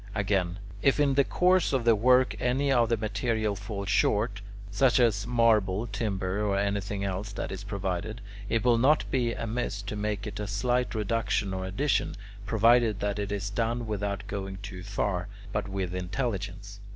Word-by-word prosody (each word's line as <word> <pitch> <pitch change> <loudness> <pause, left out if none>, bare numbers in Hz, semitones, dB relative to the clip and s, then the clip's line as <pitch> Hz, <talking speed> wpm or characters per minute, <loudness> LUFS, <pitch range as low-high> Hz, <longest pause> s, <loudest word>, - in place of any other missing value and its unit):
Again, 95 -3 0 0.2
if 135 +1 +3
in 140 -2 +3
the 140 +1 +4
course 180 +3 +2
of 130 -3 +1
the 115 -1 +6
work 125 +4 +4
any 135 +3 +1
of 120 -3 +3
the 115 - +2
material 110 0 -1
fall 100 -1 -5
short, 105 +1 +1 0.3
such 125 +5 +3
as 110 -3 +2
marble, 110 -4 +3
timber, 100 -2 -2
or 100 -2 +1
anything 100 0 -1
else 100 +2 -3
that - - -4
is 95 +1 -6
provided, 100 +2 -3 0.3
it 115 +1 0
will 120 -2 +4
not 145 +5 +4
be 120 -3 +1
amiss 115 -3 -3
to 100 +1 -5
make 105 -1 -2
a 105 0 -5
slight 120 +5 0
reduction 105 -2 0
or 95 0 -3
addition, 130 +10 0 0.3
provided 115 0 +4
that 100 0 -1
it 100 0 -3
is 100 0 -3
done 115 +2 -1
without 105 -1 -3
going 95 -1 -5
too 95 -2 -7
far, 100 -1 -2 0.3
but 105 0 -1
with 95 -2 -3
intelligence. 100 0 -4
105 Hz, 170 wpm, -28 LUFS, 100-115 Hz, 0.3 s, the